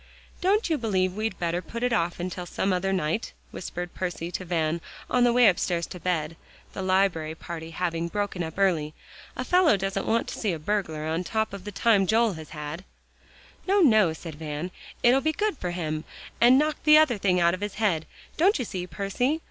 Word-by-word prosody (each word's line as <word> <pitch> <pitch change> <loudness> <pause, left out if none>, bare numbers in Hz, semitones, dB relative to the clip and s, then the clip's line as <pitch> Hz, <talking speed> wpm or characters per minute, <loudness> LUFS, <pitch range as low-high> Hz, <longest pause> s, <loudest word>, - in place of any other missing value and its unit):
"Don't 400 +5 +2
you 320 -3 0
believe 190 -5 0
we'd 215 -1 -3
better 175 0 -1
put 235 +5 -6
it 250 -1 +1
off 175 -4 0
till 180 0 -6
some 190 +2 0
other 190 +1 0
night?" 185 +3 -1 0.2
whispered 175 -1 -6
Percy 175 -2 -4
to 185 - -4
Van 165 -2 -1 0.3
on 250 - +4
the 240 - +5
way 245 -1 +6
upstairs 175 -2 +1
to 180 - -9
bed, 165 -2 -1 0.4
the - - -5
library 185 -4 +1
party 165 0 -7
having 170 0 -2
broken 205 0 -2
up 160 -1 -4
early. 165 -6 +1 0.4
"A - - -3
fellow 360 - +4
doesn't 195 0 -2
want 230 +1 +1
to - - -6
see 205 -5 0
a - - -3
burglar 160 -3 -2
on 160 +3 -1
top 220 +3 -1
of 200 -1 -8
the 205 - -5
time 205 -2 +3
Joel 225 0 +3
has 160 -2 -9
had." 150 +3 -6 0.8
"No, 400 +2 +4
no," 215 - +5
said 160 0 -8
Van; 150 +3 -5 0.3
"it'll 250 +3 +5
be 315 - +1
good 420 +3 0
for 180 - -3
him, 155 -3 -3 0.4
and 245 +2 +7
knock 305 +2 +1
the 305 0 +8
other 265 -9 +4
thing 185 -2 +2
out 170 0 +4
of 185 - -4
his 205 -1 -4
head, 180 -8 0 0.3
don't 380 +6 +4
you 250 - -2
see, 180 -3 -5
Percy? 245 - -1
185 Hz, 205 wpm, -26 LUFS, 170-225 Hz, 0.8 s, the